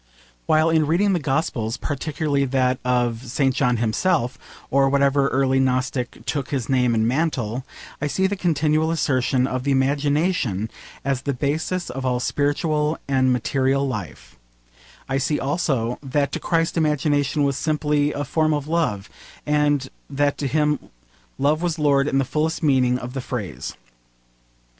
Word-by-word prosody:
While 155 +1 +4
in 160 -2 +3
reading 195 +6 +2
the 175 - +1
Gospels 135 -5 -1
particularly 145 0 -1
that 130 -1 +1
of 120 -2 0
St. 135 +2 +1
John 125 -2 +1
himself, 125 +4 0 0.3
or 135 0 +4
whatever 140 0 +3
early 135 0 +2
Gnostic 130 -1 -1
took 140 -4 -2
his 130 -5 -2
name 125 -3 +2
and 110 0 +2
mantle 130 -4 -1 0.4
I 150 - 0
see 190 +6 0
the 200 +1 +1
continual 160 -3 +1
assertion 130 -5 +1
of 130 -1 -2
the 140 - -1
imagination 140 - +1 0.3
as 135 -2 0
the 140 -1 -2
basis 160 +6 -2
of 135 +1 -5
all 125 -1 0
spiritual 150 +3 0
and 130 -1 +2
material 135 +3 +1
life, 105 - -6 0.7
I 135 0 0
see 145 +2 0
also 135 -5 -1
that 140 0 -1
to - - -3
Christ 165 0 0
imagination 150 -2 +1
was 140 -1 +1
simply 150 0 +1
a 145 - -3
form 155 +3 +1
of 145 -1 -4
love, 155 -12 0 0.4
and 145 -2 +2 0.2
that 145 0 +1
to 140 - -1
him 150 +2 +1 0.6
love 150 +3 +1
was 175 -2 -1
lord 140 -2 +3
in 135 - +1
the 135 - +2
fullest 155 +5 -1
meaning 130 -4 +3
of 125 0 -7
the 135 - -3
phrase. 95 - -5
140 Hz, 155 wpm, -22 LUFS, 130-150 Hz, 0.7 s, While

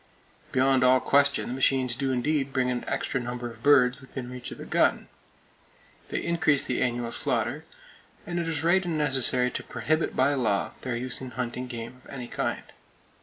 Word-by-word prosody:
Beyond 130 0 +3
all 130 0 +6
question, 140 +2 +3
the - - -3
machines 130 -1 +2
do 135 +2 -1
indeed 135 +2 0
bring 125 -1 +1
an 125 - -2
extra 135 - -1
number 120 0 -5
of 115 0 -15
birds 135 -1 +4
within 130 -1 -7
reach 125 -1 -7
of - - -8
the - - -8
gun! - - +1 1.0
They - - -2
increase 165 -4 +2
the 125 - -1
annual 120 -2 -1
slaughter; - - -2 0.6
and 175 0 -3
it 170 - -2
is 160 -1 -2
right 180 +3 +4
and 170 -3 -2
necessary 130 -3 +2
to - - -5
prohibit 155 +1 -1
by 135 +3 +3
law 110 -7 0
their 125 -2 -3
use 125 +1 -1
in 130 - -6
hunting 125 0 -4
game 120 +1 -7
of - - -17
any 125 -3 -6
kind. - - -2
130 Hz, 185 wpm, -27 LUFS, 125-140 Hz, 1.0 s, all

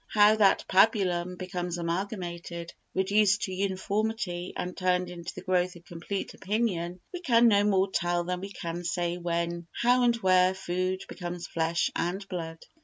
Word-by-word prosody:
How 210 0 +5
that 200 -3 +4
pabulum 185 -3 +3
becomes 180 -1 -4
amalgamated, 170 -1 -4 0.2
reduced 205 +1 +3
to 190 - -3
uniformity 195 -1 -2
and 180 0 -4
turned 180 -1 0
into 170 -1 -7
the - - -8
growth 185 -1 +1
of 175 0 -14
complete 175 +4 -5
opinion 190 -4 -1
we 360 - -4
can 235 -7 +5
no 205 -2 +5
more 195 -2 +2
tell 175 -1 0
than 180 +1 -3
we 195 - -5
can 170 -2 -5
say 175 0 -1
when, 170 0 -2
how 245 +1 +4
and 240 -1 +4
where 185 -3 +4
food 185 0 -2
becomes 175 -1 -6
flesh 165 +1 0
and 190 +3 -2
blood. 165 -3 -5
185 Hz, 160 wpm, -28 LUFS, 175-200 Hz, 0.2 s, How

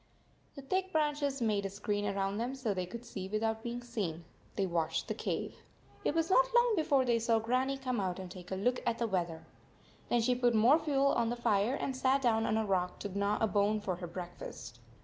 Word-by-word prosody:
The 275 - -9
thick 375 +6 -1
branches 290 -4 0
made 210 -3 +1
a 195 - -2
screen 205 +1 -2
around 195 0 -1
them 245 +4 -2
so 250 -6 -1
they 185 -2 -3
could 235 +6 -8
see 190 -4 -6
without 220 +1 -1
being 240 +1 -4
seen. 190 -9 -4 0.3
They 195 - +1
watched 165 -3 -1
the - - -1
cave. - - -3 0.5
It 295 - 0
was 330 +2 +1
not - - +6
long 480 -1 +5
be 330 - +2
fore 280 -4 +3
they 235 -2 +2
saw 230 0 +2
Grannie 255 +4 0
come 255 -3 -2
out 185 -2 -2
and 185 -2 -7
take 180 -1 -10
a 190 - -2
look 245 +6 0
at 235 -1 0
the 235 - 0
weather. 175 -6 -2 0.6
.Then 240 - +3
she 250 +2 +3
put 245 -1 +2
more 245 +9 +6
fuel 280 -3 +2
on 230 -1 +1
the 240 - -1
fire 225 +1 +1
and 270 -2 -3
sat 260 +1 +2
down 225 -2 +2
on 220 - +1
a 220 - +1
rock 180 -2 0
to 200 -2 -5
gnaw 200 +1 +1
a - - +5
bone 210 +1 +2
for 185 -4 -3
her 175 -1 -6
breakfast. 170 -9 -8
225 Hz, 230 wpm, -32 LUFS, 195-260 Hz, 0.6 s, not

